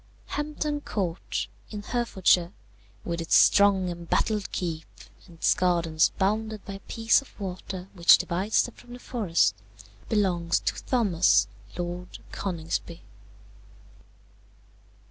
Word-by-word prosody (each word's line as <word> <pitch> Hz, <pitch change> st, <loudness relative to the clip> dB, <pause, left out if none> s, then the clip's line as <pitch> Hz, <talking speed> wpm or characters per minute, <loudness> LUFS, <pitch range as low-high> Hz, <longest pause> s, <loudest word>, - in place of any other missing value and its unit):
"Hampton 295 Hz, 0 st, -3 dB
Court, 185 Hz, -, -3 dB, 0.2 s
in 210 Hz, -1 st, -7 dB
Herefordshire, 190 Hz, -7 st, +1 dB, 0.5 s
with 170 Hz, -1 st, -3 dB
its 165 Hz, -, +2 dB
strong 200 Hz, -2 st, +5 dB
embattled 175 Hz, +4 st, -1 dB
keep, 165 Hz, -3 st, -3 dB, 0.4 s
and 170 Hz, -, -15 dB
its -, -, +3 dB
gardens 170 Hz, -3 st, +2 dB
bounded 215 Hz, +2 st, -1 dB
by 200 Hz, -, -6 dB
a 195 Hz, -, -8 dB
piece 225 Hz, +5 st, +2 dB
of 275 Hz, -, -19 dB
water 185 Hz, -1 st, -6 dB
which 175 Hz, -2 st, +7 dB
divides 190 Hz, +5 st, +1 dB
them -, -, -7 dB
from 245 Hz, -, -14 dB
the 245 Hz, -, -9 dB
forest, 200 Hz, -, +1 dB, 0.6 s
belongs 175 Hz, -6 st, +1 dB
to -, -, -3 dB
Thomas, 200 Hz, -9 st, +3 dB, 0.3 s
Lord 175 Hz, +1 st, -5 dB
Coningsby. 170 Hz, -2 st, -4 dB
190 Hz, 115 wpm, -26 LUFS, 170-215 Hz, 0.6 s, which